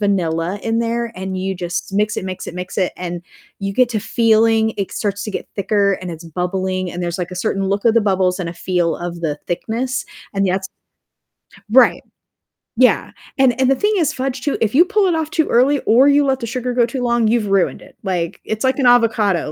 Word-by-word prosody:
vanilla 180 -2 0
in 225 0 0
there, 235 0 -1
and 190 0 -4
you 190 +1 -2
just 175 +1 -4
mix 210 +1 +1
it, - - -5
mix 185 -1 -6
it, - - -7
mix 180 0 -6
it, 185 -3 0
and 175 -1 -5 0.4
you 195 0 -2
get 250 +3 +3
to 225 - -1
feeling 225 -1 +3
it 200 -2 -3
starts 200 -1 -2
to 215 - -4
get - - -5
thicker, 200 0 +2
and 180 - -5
it's 165 +1 -8
bubbling, 185 +2 -2
and 175 +1 -5
there's, 175 0 -2
like, 180 0 -3
a 180 - -6
certain 195 +1 -1
look 200 +2 -1
of 225 - +4
the 230 - +5
bubbles 190 -2 +1
and 175 - -3
a - - -7
feel 175 -1 -1
of 175 -1 -6
the 150 -2 -2
thickness, 240 +9 -2 0.3
and 195 0 +1
yet 190 +1 +1 1.1
Right. 255 +1 +5 0.7
Yeah. 250 +2 +3 0.3
And 260 -3 +3
and 260 - +3
the 270 - +4
thing 415 +10 +1
is 325 -6 +1
fudge, 260 0 -3
too, 290 - -1
if 220 -1 0
you 310 +6 +7
pull 415 +2 +1
it 350 - +1
off 320 -1 -2
too 315 0 +1
early 270 +4 +3
or 250 +5 +5
you 285 0 +4
let 265 -1 +1
the 235 - -4
sugar 250 +1 -3
go 240 -1 +3
too 245 +2 -4
long, 235 -2 +2
you've 225 -2 +1
ruined 195 -2 +1
it. - - -16
Like, 175 -4 -2
it's 220 +2 -3
like 260 +1 +1
an 260 - +3
avocado, 220 -9 +3
210 Hz, 230 wpm, -19 LUFS, 185-245 Hz, 1.1 s, you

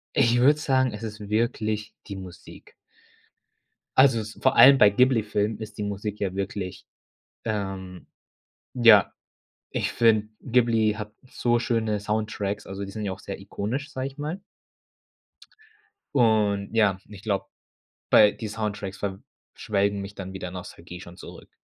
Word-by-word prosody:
Ich 120 +1 +4
würde 145 +4 +5
sagen, 130 -4 +2
es 105 +2 -8
ist 105 -2 -7
wirklich 110 -1 -1
die 100 - -6
Musik. 95 -2 -12 1.2
Also, 130 -4 +5
es 110 0 -7
ist - - -17
vor - - +3
allem 135 +3 +9
bei 105 - +8
Ghibli-Filmen 110 -3 +1
ist 110 -1 -8
die - - -4
Musik 105 +1 -4
ja 95 -2 -2
wirklich, 95 -1 -5 0.6
ähm 95 -4 -4 0.7
ja, 115 -5 +6 0.6
ich - - -2
finde, 110 -2 +3
Ghibli 115 -4 +2
hat 105 -1 -7 0.2
so 120 -1 +1
schöne 115 -3 -1
Soundtracks, 105 -1 -3
also 95 +1 -5
die 100 - -8
sind 105 +1 -5
ja 95 - -2
auch 95 - -8
sehr 100 - -7
ikonisch, 110 +9 -4
sage 130 0 -3
ich 135 - -8
mal. 155 +6 -4 1.7
Und 110 -4 +2
ja, 105 -4 +3
ich 100 -2 -12
glaube, 100 -2 -1 0.6
bei 105 -1 +7
die 110 - -7
Soundtracks 105 -2 -4
ver 100 -1 -4 0.4
schwelgen 100 -4 0
mich 100 +1 -8
dann 95 -1 -7
wieder 90 -2 -5
Nostalgie 90 -1 -9
schon 85 -1 -11
zurück. - - -12
105 Hz, 150 wpm, -25 LUFS, 100-115 Hz, 1.7 s, allem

